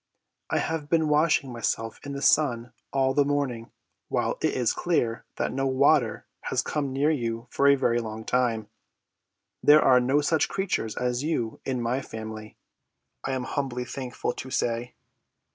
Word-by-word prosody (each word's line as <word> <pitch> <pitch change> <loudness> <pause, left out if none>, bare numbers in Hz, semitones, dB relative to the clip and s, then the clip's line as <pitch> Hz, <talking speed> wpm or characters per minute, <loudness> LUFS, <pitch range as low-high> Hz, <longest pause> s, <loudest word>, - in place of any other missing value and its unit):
I - - +1
have 160 -2 -2
been 160 -1 +2
washing 150 -3 +2
myself 115 -1 -2
in 140 - -6
the 140 +1 -4
sun 125 -6 +2 0.2
all 135 -1 +2
the 145 - +4
morning, 140 -5 -2 0.4
while - - -1
it - - +1
is 125 -3 +1
clear 120 -10 0
that - - -2
no 135 +1 0
water 135 -2 +3 0.2
has - - 0
come 145 -3 -2
near 140 +4 +2
you 115 -5 -2
for 140 - +3
a 140 - +7 0.2
long 110 -1 -6
time. 120 -4 0 0.9
There 150 +1 +7
are 125 -1 +6
no 130 +4 +2
such 155 +1 +1
creatures 190 - -2
as 125 0 0
you 140 -8 -2
in 125 -3 -1
my 125 +3 0
family, 110 -2 -8 0.7
I 135 - -2
am 130 -1 -2
humbly 130 -2 -3
thankful 125 -1 -4
to 130 - -7
say." 120 -1 -2
130 Hz, 160 wpm, -26 LUFS, 115-145 Hz, 0.9 s, a